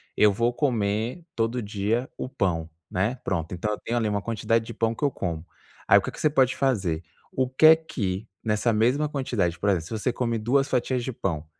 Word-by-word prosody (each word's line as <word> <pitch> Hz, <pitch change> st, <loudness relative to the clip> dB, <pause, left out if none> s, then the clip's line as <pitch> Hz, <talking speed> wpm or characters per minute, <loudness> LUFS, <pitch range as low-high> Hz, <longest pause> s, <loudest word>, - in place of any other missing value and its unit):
eu 105 Hz, -1 st, +5 dB
vou 115 Hz, +4 st, +1 dB
comer 120 Hz, -, -1 dB
todo 115 Hz, +2 st, 0 dB
dia 105 Hz, +4 st, -1 dB
o -, -, -4 dB
pão", 85 Hz, -10 st, -1 dB, 0.2 s
né? 100 Hz, +7 st, 0 dB
Pronto, 85 Hz, -2 st, -2 dB
então 100 Hz, +4 st, -2 dB
eu -, -, -5 dB
tenho 120 Hz, -, -2 dB
ali 115 Hz, -2 st, +1 dB
uma 105 Hz, -1 st, 0 dB
quantidade 115 Hz, +1 st, 0 dB
de 115 Hz, -, -7 dB
pão 115 Hz, 0 st, 0 dB
que -, -, -7 dB
eu 145 Hz, -, +3 dB
como. 85 Hz, -7 st, -4 dB, 0.4 s
Aí, -, -, +8 dB
o -, -, +4 dB
que -, -, -4 dB
é -, -, -7 dB
que -, -, -8 dB
você 155 Hz, -, +4 dB
pode 130 Hz, -3 st, +3 dB
fazer? 95 Hz, -12 st, 0 dB, 0.3 s
O 130 Hz, -1 st, 0 dB
que 130 Hz, +4 st, +3 dB
é 160 Hz, +1 st, +10 dB
que, 110 Hz, -10 st, -4 dB, 0.2 s
nessa 110 Hz, +2 st, +1 dB
mesma 125 Hz, +7 st, +2 dB
quantidade, 115 Hz, -, -1 dB
por 100 Hz, -, +1 dB
exemplo, 85 Hz, -5 st, +1 dB
se -, -, -11 dB
você 115 Hz, +3 st, -1 dB
come 115 Hz, -2 st, -1 dB
duas 135 Hz, +6 st, +2 dB
fatias 125 Hz, -1 st, 0 dB
de 130 Hz, -, -3 dB
pão, 85 Hz, -9 st, -3 dB
115 Hz, 230 wpm, -25 LUFS, 100-130 Hz, 0.4 s, é